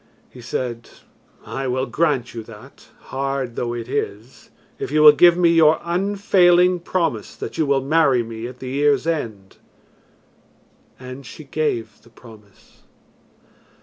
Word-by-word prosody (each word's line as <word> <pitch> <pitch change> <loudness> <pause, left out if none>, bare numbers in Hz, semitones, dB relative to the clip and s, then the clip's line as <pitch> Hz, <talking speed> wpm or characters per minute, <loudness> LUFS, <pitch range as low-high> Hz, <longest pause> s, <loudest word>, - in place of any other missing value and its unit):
He 125 - -13
said 120 -1 -5 0.6
"I 135 0 -4
will 130 +1 -1
grant 135 -1 -1
you 115 - -6
that, 115 +4 -15 0.3
hard 135 -2 -3
though 120 0 -3
it 115 -1 -6
is, 125 -3 -5 0.3
if - - -4
you 150 +2 +2
will 150 - +11
give 175 +3 +5
me 175 -1 +4
your 160 -1 +4
unfailing 180 -1 +3
promise 165 - -2
that - - -7
you 155 - +1
will 140 -1 +2
marry 140 -4 +2
me 115 0 -7
at 125 0 -11
the 130 0 -7
year's 145 +1 +1
end." 115 -12 -4 1.4
And 130 +1 -9
she 155 - -11
gave 135 -6 -3
the 115 - -21
promise. 110 -4 -19
135 Hz, 145 wpm, -21 LUFS, 120-160 Hz, 1.4 s, will